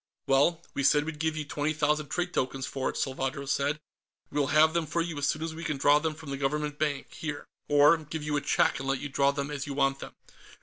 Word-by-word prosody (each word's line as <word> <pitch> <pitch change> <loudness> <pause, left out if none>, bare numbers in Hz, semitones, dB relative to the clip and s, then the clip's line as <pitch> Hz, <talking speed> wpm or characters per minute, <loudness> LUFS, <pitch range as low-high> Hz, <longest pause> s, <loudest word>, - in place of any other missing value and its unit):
"Well, 145 +5 +3
we 140 - -2
said 145 +2 +4
we'd 155 -1 -6
give 160 0 -1
you 150 - -3
twenty 145 +1 -1
thousand 150 0 +1
trade 175 0 -2
tokens 130 0 -1
for 135 -1 -2
it," - - -5
Salvadro 135 0 -2
said. 140 +2 0 0.5
"We'll 145 -1 +1
have 155 +2 +5
them 170 -2 0
for 170 - -1
you 165 -3 -2
as 145 - +1
soon 155 +2 -1
as 165 0 -3
we 165 +1 -7
can 155 -4 -2
draw 145 +2 +5
them 155 0 -2
from 155 -2 -9
the 140 - -3
Government 150 +2 -2
bank, 145 -3 -2
here. 155 -2 -5 0.2
Or 145 +3 +6
give 155 0 -6
you 150 0 -1
a 145 - +1
check - - +2
and 135 - -5
let 135 -1 +1
you 145 - -5
draw 140 0 +3
them 140 0 -2
as 140 -1 -4
you 140 - -4
want 135 -1 +1
them." - - -9
145 Hz, 255 wpm, -28 LUFS, 140-155 Hz, 0.5 s, Or